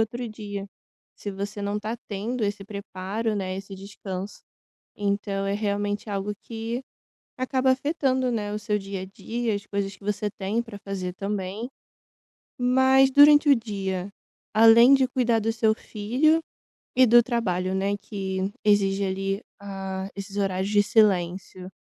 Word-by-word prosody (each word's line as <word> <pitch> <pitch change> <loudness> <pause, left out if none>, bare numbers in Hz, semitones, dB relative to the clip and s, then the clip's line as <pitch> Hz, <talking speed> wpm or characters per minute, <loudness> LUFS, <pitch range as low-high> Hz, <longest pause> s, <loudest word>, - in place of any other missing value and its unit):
outro 235 +2 -2
dia. 205 -2 -6 0.5
Se 205 - -5
você 200 +1 -5
não 205 +1 -1
tá 220 +3 -3
tendo 220 +4 -2
esse 205 0 -2
preparo, 200 +2 -4
né, 190 -2 -3
esse 195 0 -8
descanso, 195 0 -7 0.5
então, 200 -1 -1
é 200 - 0
realmente 205 0 -2
algo 200 +1 -2
que 230 +2 -4 0.6
acaba 260 0 +1
afetando, 260 -2 +1
né, 210 -2 -2
o 210 - -2
seu 210 0 -1
dia 195 -1 -5
a - - -4
dia, 225 +3 -3
as 200 - -4
coisas 200 -1 -3
que 190 - -20
você 210 0 -1
tem 200 +3 -2
pra 230 -4 -8
fazer 195 -3 -4
também. 200 +3 -4 0.9
Mas 260 +2 +4
durante 290 +2 +7
o 280 - +8
dia, 195 -4 -3 0.4
além 230 +4 +8
de 265 -2 +4
cuidar 240 -3 +1
do 225 +1 0
seu 220 -1 +2
filho 250 +11 +1 0.6
e 255 0 +6
do 240 +1 +7
trabalho, 190 -6 -1
né, 200 +1 0
que 195 -1 -4
exige 200 -1 +3
ali, 195 +2 -2 0.2
ah, 195 -1 -5
esses 200 0 -7
horários 195 0 0
de 205 -1 +4
silêncio, 185 -3 +1
205 Hz, 150 wpm, -25 LUFS, 195-230 Hz, 0.9 s, o